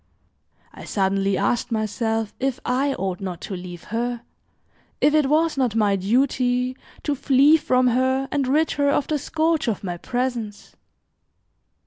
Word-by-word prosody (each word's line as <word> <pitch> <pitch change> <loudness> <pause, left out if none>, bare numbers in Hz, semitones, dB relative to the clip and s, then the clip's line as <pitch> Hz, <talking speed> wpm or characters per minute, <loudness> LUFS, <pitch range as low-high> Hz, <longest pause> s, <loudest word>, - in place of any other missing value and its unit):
I - - -11
suddenly 195 0 0
asked 235 +5 0
myself 220 0 -1
if 265 -1 -1
I 270 +2 +1
ought 190 -1 -3
not 185 -3 -5
to 195 - -5
leave 175 -1 -8
her, 240 +1 -2 0.8
if 290 - +3
it 300 -3 +3
was 315 0 +2
not 245 -5 +1
my 210 -3 +3
duty 250 +4 +1 0.3
to 295 - 0
flee 280 +2 +4
from 255 -5 +2
her 260 +2 +1
and 280 -3 0
rid 305 +4 +2
her 285 0 +1
of 285 - +1
the 305 -1 -1
scourge 320 +1 0
of 215 -4 -2
my 175 -2 -4
presence. 240 -1 -4
250 Hz, 150 wpm, -23 LUFS, 210-280 Hz, 0.8 s, flee